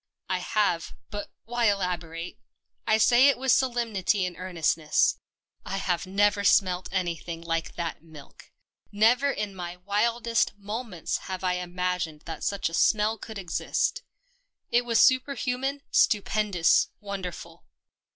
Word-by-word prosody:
I 185 -1 0
have 180 -3 0
— - - -49
but 205 0 -5 0.2
why 240 +1 0
elaborate? 175 -4 -2 0.5
I 220 - +4
say 245 +4 +6
it 280 - +4
with 260 0 +1
solemnity 225 -7 +1
and 180 -1 -5
earnestness: 165 -4 +1 0.4
I 195 - -4
have 185 -1 -1
never 200 +1 +2
smelt 185 -2 +3
anything 170 -2 -3
like 165 -1 -2
that 170 -3 -4
milk? 155 -3 -15 0.4
Never 235 +7 +3
in 210 -7 -3
my 175 -1 -6
wildest 230 +5 0
mo 210 +4 -4
ments 180 -9 -3
have 185 0 -4
I 180 -1 +1
imagined 180 -3 -3
that 160 -2 -7
such 200 -1 0
a 165 - -7
smell 215 +4 +2
could 220 -2 -8
exist. 180 -4 -1 0.7
It 240 +1 +3
was 230 -1 +2
superhuman, 270 +1 +2
stupendous, 205 -5 +3
wonderful. 195 -4 -7
195 Hz, 135 wpm, -27 LUFS, 175-225 Hz, 0.7 s, say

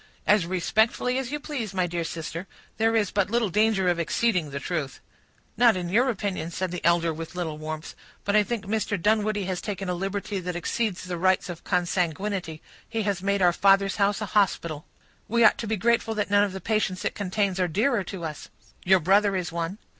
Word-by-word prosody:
"As 205 -5 +3
respectfully 220 +7 +1
as 265 -1 -4
you 295 - -2
please, 240 -10 -5
my 185 -1 +2
dear 170 -1 -2
sister; 165 +2 -5 0.3
there 225 +1 +2
is 210 -3 +1
but 200 -1 +1
little 230 -3 +1
danger 210 -1 +2
of 175 -1 +2
exceeding 180 -1 +1
the 140 0 -4
truth." 150 -2 -3 0.6
"Not 235 -5 +5
in 175 -1 -3
your 240 +8 +3
opinion," 195 -7 -2
said 185 +1 -3
the 180 - -5
elder, 170 -1 +3
with 165 +3 -8
a - - -9
little 160 -4 -3
warmth. 155 +1 -6 0.3
"But 205 - +1
I 210 - +7
think 220 0 -3
Mr. 210 0 -1
Dunwoodie 210 +1 +1
has 185 -1 -3
taken 195 -3 -4
a - - 0
liberty 195 +2 -3
that 180 -1 -4
exceeds 190 +3 -2
the 180 -2 -4
rights 185 +1 +2
of 175 -2 -7
consanguinity; 180 -1 -1 0.3
he 225 -1 -1
has 200 -3 -1
made 200 0 +1
our 175 -1 +5
father's 195 +1 +3
house 200 0 +1
a - - -1
hospital." 170 -7 +1 0.4
"We 235 +2 +2
ought 220 - +5
to 230 - -3
be 220 0 0
grateful 225 +2 +1
that 210 -1 -2
none 205 0 +5
of 195 - -5
the 190 - -6
patients 210 -2 -1
it - - 0
contains 200 -1 -1
are 180 - +2
dearer 210 - +1
to 185 -1 -7
us." 155 -2 -7 0.3
"Your 190 0 +4
brother 200 +4 +3
is 175 -3 -2
one." 170 +3 -3
195 Hz, 215 wpm, -26 LUFS, 175-210 Hz, 0.6 s, I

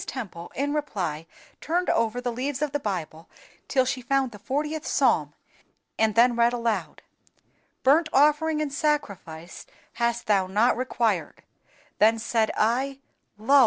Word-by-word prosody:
Temple 180 -9 -7
in 285 +2 -1
reply 185 - -3 0.3
turned 350 +3 -1
over 230 +2 +1
the 245 0 -2
leaves 265 +4 -3
of 300 - -1
the 290 - -1
Bible, 170 - -5 0.4
till 260 -2 +2
she 255 0 -2
found 265 +1 0
the 205 - -11
fortieth 300 +8 -2
Psalm, - - +2 0.6
and 220 -1 +2
then 240 +1 +5
read 235 +1 +3
aloud, 235 -2 -2 0.8
"_Burnt 305 +5 +5
offering 300 +2 +3
and 285 -2 -5
sacrifice 200 - -3 0.3
hast 235 0 -1
Thou 200 -4 +2
not 210 +6 +3
required. 225 -8 -1 0.6
Then 220 +2 +5
said 225 -1 0
I, 260 +5 +1 0.4
Lo! 270 +7 +4
240 Hz, 140 wpm, -25 LUFS, 215-280 Hz, 0.8 s, then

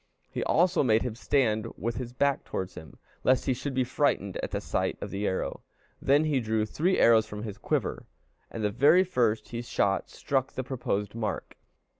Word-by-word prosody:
He - - -2
also 175 +2 +3
made 115 -5 +3
him 125 -3 -3
stand 110 -3 +1
with 115 +1 -3
his 120 -1 -5
back 140 +2 +1
towards 95 0 -4
him, 80 -5 -11 0.3
lest 130 0 +3
he 130 - +2
should 135 +2 -4
be 130 - +3
frightened 125 -7 0
at - - -3
the - - -2
sight - - -1
of - - -6
the 100 +1 -2
arrow. 95 - -2 0.4
Then 145 +3 +4
he 150 -4 +1
drew 110 -2 0
three 170 - +1
arrows 110 -2 +5
from 105 0 -6
his 105 -3 -6
quiver, - - -2 0.4
and 110 - -5
the 105 - +1
very 150 - +5
first 120 - 0
he 120 0 -4
shot 100 -4 0
struck 135 -1 -1
the 130 - -3
proposed 105 -6 -2
mark. 110 -2 -4
120 Hz, 195 wpm, -28 LUFS, 105-135 Hz, 0.4 s, arrows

